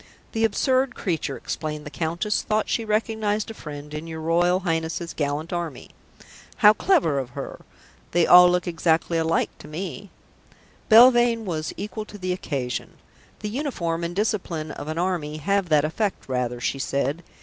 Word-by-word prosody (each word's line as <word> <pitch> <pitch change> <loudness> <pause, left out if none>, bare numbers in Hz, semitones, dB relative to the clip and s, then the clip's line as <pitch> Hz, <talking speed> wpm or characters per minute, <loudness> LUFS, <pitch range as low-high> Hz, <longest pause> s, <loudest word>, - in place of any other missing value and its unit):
"The 225 -1 +1
absurd 255 +4 +1
creature," 160 -7 -2
explained 150 -1 -5
the 150 - -7
Countess, 170 +7 -1
"thought 215 -1 0
she 230 - 0
recognized 215 0 -1
a - - -7
friend 150 -5 -9
in 155 +2 -5
your 160 -1 -6
Royal 175 +3 +2
Highness's 165 -1 -2
gallant 150 +3 -2
Army." 170 -6 -5 0.6
"How 210 - +7
clever 235 - +2
of 130 -2 -4
her! - - -6 0.5
They 170 -1 +3
all 180 0 +9
look 180 0 +1
exactly 165 0 +1
alike 165 0 +1
to - - -11
me." 180 +4 -6 0.8
Belvane 240 0 +6
was 155 -4 -3
equal 210 +2 -5
to 205 - -11
the 185 -2 -2
occasion. 135 - -4 0.5
"The 210 - -3
uniform 195 - -2
and 170 +1 -3
discipline 180 -7 -1
of 145 - -7
an 155 +1 -4
army 170 -4 -1
have 195 +3 0
that 150 -2 +4
effect 200 +6 -2
rather," 125 -2 -2
she 135 +3 -2
said. 140 +4 -1
170 Hz, 160 wpm, -24 LUFS, 155-210 Hz, 0.8 s, all